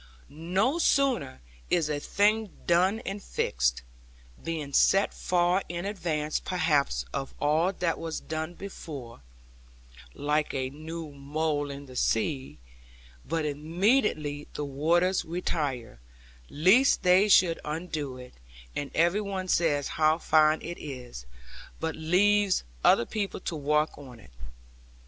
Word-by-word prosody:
No 185 - 0
sooner 260 - +1 0.3
is 170 -4 +2
a 150 -1 -2
thing 210 +6 +1 0.2
done 185 +6 +3
and 200 -1 -5
fixed, - - -1 0.6
being 155 -4 -4
set 195 +8 +4
far 180 +1 +1
in 175 +1 -4
advance 165 -7 -2
perhaps 145 - 0
of 135 - -4
all 155 +5 +2
that 175 -3 -1
was 165 -1 -4
done 160 +2 -5
before 145 - -9 0.9
(like 150 +1 0
a 130 -1 -2
new 155 +1 -7
mole 145 +1 -2
in 140 0 -7
the 130 -2 -13
sea), 130 +3 -1 0.7
but 160 +1 -1
immediately 155 - 0
the 150 - -3
waters 170 +7 +1
retire, 145 - -3 0.5
lest 195 - +4
they 185 +3 +5
should 175 -4 +5
undo 150 -4 -4
it; 125 0 -11 0.4
and 145 - -3
every 175 +6 +3
one 195 -2 -4
says 155 -5 +1
how 155 0 +2
fine 155 -1 +3
it 175 - -6
is, 125 - -8 0.5
but 160 0 -2
leaves 190 +5 +2 0.2
other 120 - +5
people 205 - -3
to 170 - -4
walk 150 +1 0
on 125 -5 -12
it. 65 - -17
160 Hz, 125 wpm, -28 LUFS, 145-180 Hz, 0.9 s, they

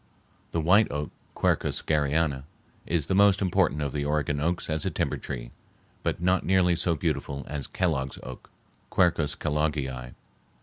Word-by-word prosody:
The 85 - 0
white 95 +7 +4
oak 75 0 -3 0.2
(Quercus - - +1
Garryana) 75 -2 +1 0.4
is 80 -4 0
the 95 - -1
most 100 0 +5
important 80 -6 +1
of 70 - -2
the 75 0 -2
Oregon 75 0 0
oaks 85 +4 -1
as 80 -1 -1
a - - 0
timber - - -1
tree, - - -6 0.5
but - - -1
not 90 +2 +2
nearly 90 +1 +3
so 85 0 +1
beautiful 70 -4 -2
as 75 -2 -4
Kellogg's 70 -8 -1
oak 65 -1 -9 0.4
(Q. 90 -1 +5
Kelloggii). 75 -4 -2
75 Hz, 155 wpm, -27 LUFS, 70-85 Hz, 0.5 s, most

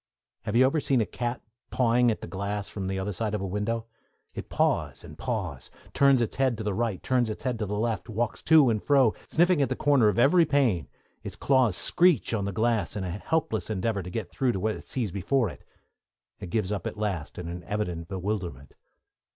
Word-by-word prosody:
Have 105 0 -2
you 130 +2 +6
ever 140 +4 +2
seen 135 -3 +1
a 110 - +2
cat 120 +2 -4 0.3
pawing 125 -1 +3
at 110 - -2
the - - -6
glass 100 +3 -4
from 95 -2 -4
the 95 0 -2
other 95 +2 -3
side 105 +2 -2
of 105 - -3
a - - -2
window? 105 +4 -2 0.5
It - - -7
paws - - 0
and - - -11
paws, - - -4 0.2
turns 140 -3 +4
its 115 - -5
head 130 -4 +2
to 110 - -5
the 105 -1 -1
right, 110 -2 -2
turns 125 -3 +1
its 110 - -6
head 125 -3 -2
to 105 - -2
the 105 +1 -2
left, 110 -4 -2
walks 115 +1 -2
to 155 -6 +6
and 105 -2 -1
fro, 135 -6 +4
sniffing 175 -1 +3
at 140 - +1
the - - -1
corner 140 -6 +3
of 105 - +1
every 150 +8 +5
pane; 130 - +1 0.3
its - - -7
claws 130 -9 +2
screech 175 - +3
on 100 -3 0
the 100 - -2
glass, 110 -3 0
in 100 - -3
a 90 - -3
helpless 110 - -2
endeavour 105 0 -1
to 90 - -7
get 95 -2 -5
through 130 -3 0
to 95 - -3
what 110 +3 0
it - - -10
sees 115 -8 -2
before 110 +5 0
it; - - -14 0.8
it 90 - -7
gives 105 0 -1
up 105 - -2
at - - -6
last, 95 -8 -3
in 90 - -5
an 85 +1 -6
evident 90 -4 -3
bewilderment. 95 -7 -4
110 Hz, 225 wpm, -27 LUFS, 95-125 Hz, 0.8 s, you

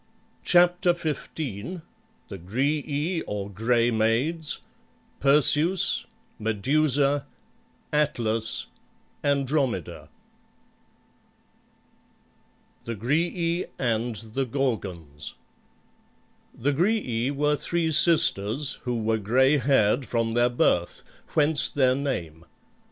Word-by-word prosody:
CHAPTER 175 0 +3
XV 160 -3 -4
THE 160 - -9
GRAEAE 145 - -2
OR 100 -1 -5
GRAY 115 +4 +1
MAIDS 120 +9 0 0.6
PERSEUS 150 +5 +5 0.3
MEDUSA 140 +6 +2 0.7
ATLAS 115 -7 0 0.6
ANDROMEDA 140 - -2 2.8
THE 115 - -5
GRAEAE 165 - -1
AND 115 -1 -2 0.2
THE 135 +1 -2
GORGONS 95 - -4 1.2
The 140 +5 -1
Graeae 140 - 0
were 150 +1 0
three 165 +2 -2
sisters 145 - +3
who 120 -3 -2
were 110 0 0
gray 130 +8 +2
haired 125 -1 +1
from 115 -1 -1
their 120 +1 +2
birth, 90 -7 0 0.3
whence 150 -1 +3
their 130 -3 +2
name. 90 - -4
135 Hz, 80 wpm, -25 LUFS, 115-155 Hz, 2.8 s, PERSEUS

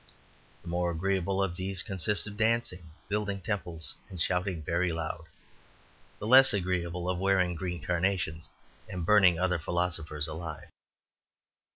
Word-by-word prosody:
The - - -14
more 85 +1 0
agreeable 95 +2 0
of 90 -3 -2
these 95 -2 -1
consist 100 +1 0
of 105 -1 -7
dancing, 110 -6 0 0.2
building 105 -1 -1
temples, 90 -4 -3 0.2
and 90 - -8
shouting 90 0 -1
very 85 +2 0
loud; 80 0 -4 0.9
the - - -6
less 130 +1 +8
agreeable, 90 -2 -2
of 90 -1 -1
wearing 95 -2 +2
green 85 -1 -4
carnations 90 -2 -1 0.4
and 90 -2 -4
burning 95 -4 +5
other 90 -1 +1
philosophers 80 -3 -2
alive. 80 -1 -7
90 Hz, 135 wpm, -29 LUFS, 85-95 Hz, 0.9 s, less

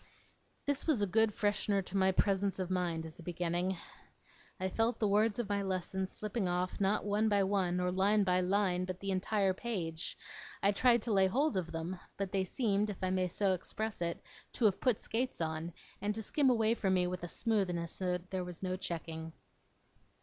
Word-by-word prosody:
This 285 +2 -1
was 265 -10 +3
a - - +4
good 220 +3 +3
freshener 205 -1 +1
to 190 - -6
my 190 -1 +4
presence 195 0 +1
of 185 -1 -3
mind, 170 -3 -1
as 160 +1 -10
a - - -8
beginning. 175 +2 -1 0.8
I 185 - 0
felt 225 +4 +1
the 215 - +1
words 210 +1 +3
of 240 -3 -1
my 200 0 0
lessons 190 0 -2
slipping 210 -1 -2
off, 180 +2 -1
not 200 +2 +2
one 210 +2 +2
by 200 -1 +3
one, 190 -2 +1
or 180 0 +1
line 200 +3 +3
by 180 -1 +2
line, 185 -1 +1
but 185 0 -4
by - - -25
the 195 0 -2
entire 195 +1 +1
page; 180 -7 -3 0.5
I 200 - +5
tried 235 +1 +4
to 230 - 0
lay 190 -1 +5
hold 270 +6 +1
of 180 -3 -2
them; 170 +3 -4 0.2
but 195 -2 -2
they 190 -1 +1
seemed, 210 0 +1
if 200 -2 -6
I 185 - +1
may 185 -1 +1
so 190 +2 +1
express 215 +3 -4
it, 170 0 -2 0.3
to 235 - +1
have 200 -3 +3
put 250 -5 +2
skates 255 +3 -2
on, 160 +1 -2 0.3
and 210 +1 0
to 220 - -3
skim 275 +5 +2
away 225 -2 +3
from 195 -5 +1
me 180 -1 +3
with 180 0 -3
a - - -2
smoothness 180 -5 0 0.3
there 185 -1 -1
was 180 0 -8
no 185 0 -1
checking. 165 -2 -5
190 Hz, 205 wpm, -33 LUFS, 180-210 Hz, 0.8 s, I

